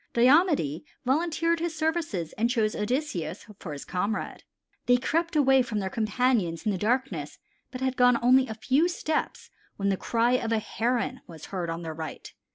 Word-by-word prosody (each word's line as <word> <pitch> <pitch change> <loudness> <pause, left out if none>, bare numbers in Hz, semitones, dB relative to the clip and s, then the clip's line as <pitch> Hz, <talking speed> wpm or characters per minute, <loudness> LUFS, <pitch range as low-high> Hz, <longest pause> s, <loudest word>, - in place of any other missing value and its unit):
Diomede 255 - +3 0.2
volunteered 330 +4 +1
his 335 -1 -2
services 310 - -1
and 230 +2 0
chose 220 -3 +1
Odysseus 210 - -2
for 165 - -7
his 145 -1 -7
comrade. 200 +4 -3 0.4
They 245 0 +6
crept 330 +6 -1
away 270 -3 +5
from 235 -3 -3
their 190 -2 -2
companions 215 -6 0
in 215 - +2
the 195 - -1
darkness 210 - -1 0.3
but 255 0 -8
had 260 0 0
gone 245 -1 +5
only 255 +2 +4
a 220 - -5
few 265 +9 +2
steps 315 -3 -3 0.3
when 200 0 0
the 195 - +1
cry 235 +4 +1
of 240 -2 0
a 225 - +3
Heron 245 +3 -1
was 160 -3 -10
heard 175 -3 -2
on 165 +1 -4
their 160 -1 -5
right. 160 -1 -7
240 Hz, 175 wpm, -27 LUFS, 195-265 Hz, 0.4 s, They